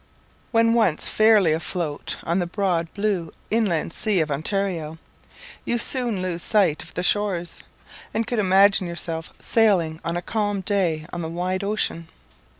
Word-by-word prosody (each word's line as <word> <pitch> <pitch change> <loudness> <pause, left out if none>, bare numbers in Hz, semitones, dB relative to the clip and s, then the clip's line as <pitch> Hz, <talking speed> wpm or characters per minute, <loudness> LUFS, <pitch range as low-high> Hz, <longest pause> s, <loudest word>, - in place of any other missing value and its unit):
When 230 0 +3
once 220 -10 +2
fairly 215 -7 +4
afloat 160 -2 -2
on 170 +3 0
the 175 - -1
broad 175 -3 -1
blue 200 -6 -1 0.2
inland 190 -8 0
sea 210 -4 +1
of 155 -2 0
Ontario, 165 0 -2 0.7
you 240 - 0
soon 235 -5 +1
lose 175 -2 -3
sight 195 -8 +2
of - - -12
the 180 - -2
shores, 185 -4 +1 0.5
and 225 +1 -1
could 240 0 -2
imagine 195 -1 +4
yourself 165 -1 -4
sailing 180 -8 +2
on 170 +1 -2
a 175 - -4
calm 205 -1 -1
day 180 -6 0
on 175 - -4
the 160 - -4
wide 180 +3 -2
ocean. 200 -5 -2
185 Hz, 150 wpm, -23 LUFS, 165-210 Hz, 0.7 s, fairly